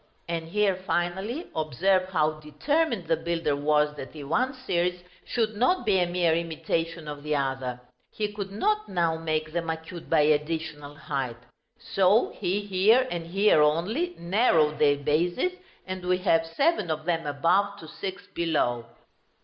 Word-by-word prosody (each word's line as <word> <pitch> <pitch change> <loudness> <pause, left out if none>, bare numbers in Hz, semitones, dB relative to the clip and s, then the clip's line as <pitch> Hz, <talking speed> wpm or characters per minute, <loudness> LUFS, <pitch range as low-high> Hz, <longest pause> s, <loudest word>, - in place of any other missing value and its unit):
And 165 -1 -3
here, 205 +2 +2
finally, 190 - -2
observe 185 +5 +1
how 155 -3 +1
determined 225 - -1
the 165 - +3
builder 165 -2 -1
was 150 +1 +2
that 135 - -8
the 150 -2 -8
one 255 - 0
series 180 -8 -1 0.2
should 220 -3 -1
not 250 - +2
be 200 -3 +3
a 175 - +2
mere 175 -2 +2
imitation 165 0 -2
of 145 -1 -6
the 150 0 -1
other; 135 -3 -2 0.3
he 210 -1 -3
could 200 -2 -5
not 425 - 0
now 170 -3 +1
make 155 -1 -2
them 170 -1 -2
acute 160 +1 -6
by 160 -2 +4
additional 150 -1 -1
height 135 -5 -3 0.4
so 200 -1 +3
he 195 +1 -1
here, 205 +6 +3
and 170 -1 -4
here 195 -2 +4
only, 205 - +1
narrowed 170 -5 +2
their 145 -1 +4
bases, 170 - +1 0.3
and 185 -1 -5
we 180 0 +2
have 165 -3 +2
seven 275 - +1
of 155 0 -2
them 165 -3 -1
above, 185 +8 +1
to 160 - -10
six 190 +4 -6
below. 120 -8 0
170 Hz, 155 wpm, -27 LUFS, 155-195 Hz, 0.4 s, by